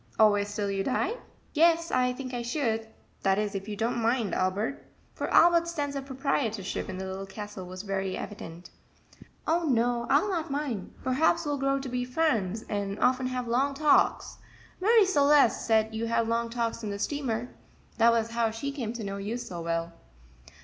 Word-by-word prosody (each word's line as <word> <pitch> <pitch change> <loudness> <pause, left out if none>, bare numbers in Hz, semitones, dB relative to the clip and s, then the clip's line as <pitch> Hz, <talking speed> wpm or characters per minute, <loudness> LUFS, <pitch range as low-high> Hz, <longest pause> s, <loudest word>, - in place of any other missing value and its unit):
"Always 205 -1 +3
till 205 -1 -1
you 195 0 -1
die?" 370 - 0 0.4
"Yes, 335 +1 +3
I 250 0 +2
think 255 0 -6
I 240 - -2
should 235 -3 -1 0.3
that 195 0 +2
is, 210 -1 -1
if 195 0 -5
you 210 - -4
don't 230 +3 -1
mind, 230 -4 +1
Albert;" 195 +8 -1 0.3
for - - -4
Albert's 340 0 +5
sense 285 -2 -2
of 275 -1 -5
proprietorship 255 -8 -2
in 185 - -5
the 190 - -4
Little 190 +1 -5
Castle 205 -2 -7
was 185 +1 -7
very 195 -2 -2
evident. 175 -4 -8 0.7
"Oh, 335 +1 +1
no, 240 -3 +1
I'll 290 +9 +4
not 340 -5 -2
mind 275 -9 -3
perhaps 315 +6 +2
we'll 290 -1 -1
grow 275 0 +1
to 270 0 -5
be 250 0 -2
friends, 235 - 0
and 200 -1 -2
often 255 0 +2
have 250 -1 -3
long 270 +4 +1
talks. 300 +1 +2 0.4
Marie 435 +2 +5
Celeste 290 - +4
said 220 -1 +3
you 225 +1 -2
had 230 0 +1
long 230 0 0
talks 230 -1 -2
on 210 - -3
the 200 - -3
steamer 245 -1 -2 0.5
that 230 +1 +6
was 230 0 0
how 230 -1 +1
she 225 +6 -4
came 240 -6 -4
to 235 -2 -5
know 200 0 -4
you 205 +4 -3
so 210 -8 -6
well." 165 0 -2
235 Hz, 185 wpm, -28 LUFS, 205-275 Hz, 0.7 s, that